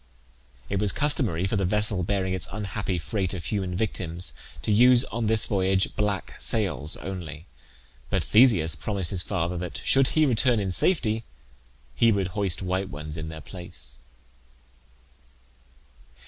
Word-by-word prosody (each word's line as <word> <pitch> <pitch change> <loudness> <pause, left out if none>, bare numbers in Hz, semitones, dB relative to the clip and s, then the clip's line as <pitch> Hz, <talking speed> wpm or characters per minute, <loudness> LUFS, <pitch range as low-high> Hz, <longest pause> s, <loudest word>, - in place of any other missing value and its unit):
It 100 - -2
was 105 -1 +1
customary 125 - 0
for 100 +3 -1
the 100 - 0
vessel 105 0 +1
bearing 95 +1 -1
its 90 -4 -1
unhappy 100 -2 -3
freight 90 +4 -3
of 85 - -7
human 95 -4 -2
victims 90 -4 0 0.3
to - - -1
use 125 +3 +6
on 115 -1 -1
this 110 0 +4
voyage 95 -1 0
black 105 -3 -2
sails 75 +5 0
only; 85 -4 -7 0.6
but - - 0
Theseus 105 - +4
promised 95 +4 -2
his 95 -3 -1
father 90 -2 -2
that, 90 -1 -6
should 135 -1 +5
he 155 - +5
return 125 -2 +3
in 95 -2 -2
safety, 115 - +1 0.7
he 115 - +3
would 100 -3 0
hoist 95 -1 -1
white 95 +1 -2
ones 75 +1 -7
in 80 -1 -5
their 80 -1 -8
place. 90 +3 -5
95 Hz, 145 wpm, -25 LUFS, 85-110 Hz, 0.7 s, use